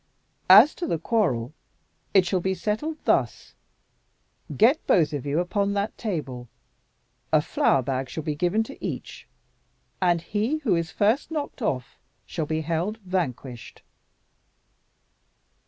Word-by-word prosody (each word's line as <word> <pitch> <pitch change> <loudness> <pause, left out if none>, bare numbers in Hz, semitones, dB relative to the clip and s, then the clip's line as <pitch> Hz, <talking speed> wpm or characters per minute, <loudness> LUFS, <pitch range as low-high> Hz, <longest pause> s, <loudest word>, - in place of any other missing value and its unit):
"As 215 +11 +9
to 350 - -4
the 165 - 0
quarrel, 155 - 0 0.6
it 190 -2 +5
shall 185 +1 0
be 190 +2 -1
settled 260 +12 -2
thus. - - 0 1.0
Get 255 +9 +4
both 160 -5 +3
of 145 -1 -4
you 145 +3 +1
upon 200 +3 0
that 200 +1 -2
table. 135 - -4 0.8
A 155 - +5
flour 135 -2 +1
bag 130 0 -2
shall 160 - -5
be 155 -1 -2
given 180 +8 +1
to 275 +5 -12
each; - - -6 0.7
and 175 -2 +3
he 215 - -1
who 210 -9 +2
is 170 -1 -1
first 215 +9 +1
knocked 300 -4 -5
off 130 - -3 0.3
shall 155 - -4
be 155 +1 -1
held 170 +7 -2
vanquished." 130 -10 -4
180 Hz, 135 wpm, -25 LUFS, 150-215 Hz, 1.0 s, As